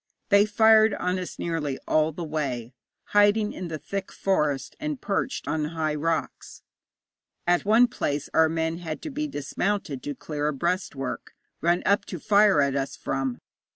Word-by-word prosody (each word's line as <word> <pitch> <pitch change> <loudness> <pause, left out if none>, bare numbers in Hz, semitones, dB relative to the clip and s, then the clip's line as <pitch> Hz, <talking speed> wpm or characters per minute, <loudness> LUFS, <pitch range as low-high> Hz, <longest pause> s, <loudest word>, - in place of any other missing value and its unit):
They 200 0 +5
fired 220 0 +5
on 180 +1 -1
us 180 - -6
nearly 155 -5 -2
all 155 0 +3
the 170 +3 -6
way, 135 -7 -3 0.4
hiding 205 +1 +3
in 185 - -5
the 160 -2 -4
thick 195 +5 -5
forest, 150 -8 0
and 300 -3 -3
perched 215 +6 -2
on 160 -1 0
high 155 -1 -2
rocks. 160 +2 -3 0.8
At 175 +2 +2
one 225 +4 +6
place 150 - -2
our 160 0 +5
men 160 +1 -1
had 160 -3 -6
to 310 - -5
be 300 +2 -2
dismounted 155 - -2
to 145 +1 -5
clear 150 0 -3
a 150 - 0
breastwork, 160 -3 -3 0.3
run 175 +3 +2
up 200 - +3
to 180 - -6
fire 205 -3 +4
at 140 -1 +1
us 135 0 -2
from. 135 -2 -2
165 Hz, 165 wpm, -26 LUFS, 150-205 Hz, 0.8 s, one